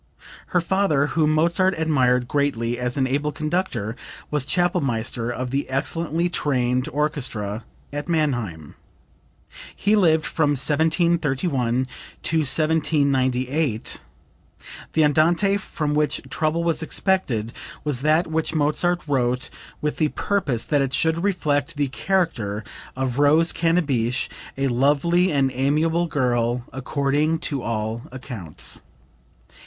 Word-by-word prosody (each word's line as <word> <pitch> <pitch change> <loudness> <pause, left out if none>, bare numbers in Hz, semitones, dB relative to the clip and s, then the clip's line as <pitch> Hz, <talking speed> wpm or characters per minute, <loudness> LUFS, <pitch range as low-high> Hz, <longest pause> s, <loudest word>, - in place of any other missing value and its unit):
Her 180 - +1
father, 170 -5 +2
whom 155 -2 +3
Mozart 170 +4 +3
admired 130 -6 +2
greatly 120 -4 0
as 125 +2 -1
an 135 - +2
able 145 +3 -1
conductor, 150 - -2 0.4
was 150 -3 0
Chapelmaster 135 - 0
of 125 +1 -4
the 140 +1 -2
excellently 165 +5 0
trained 130 -6 0
orchestra 125 -8 -2 0.3
at 145 +3 -4
Mannheim. 120 - -1 1.0
He 210 +2 +2
lived 160 -6 +3
from 150 -3 +1
1731 145 -4 +1 0.4
to 165 - 0
1798. 140 -4 +1 0.9
[The 160 - +4
Andante 170 +7 +3
from 155 -6 -3
which 150 -1 0
trouble 160 +1 0
was 165 -1 +2
expected 140 - 0 0.3
was 145 -4 -1
that 155 +4 +3
which 160 0 -2
Mozart 165 +4 +2
wrote 125 -2 0 0.3
with 150 - -1
the 155 - +2
purpose 150 - 0
that 145 -2 +2
it 135 -1 -1
should 165 +1 +1
reflect 165 -5 0
the 145 -2 0
character 130 - -1 0.3
of 130 0 -2
Rose 155 +4 +4
Cannabich, 140 -8 0 0.3
a 135 0 +1
lovely 145 +8 +2
and 135 -2 +2
amiable 155 +6 +1
girl, 120 -4 0
according 140 +4 0
to 140 -4 -3
all 110 0 -3
accounts. 120 - -2
145 Hz, 115 wpm, -23 LUFS, 125-165 Hz, 1.0 s, The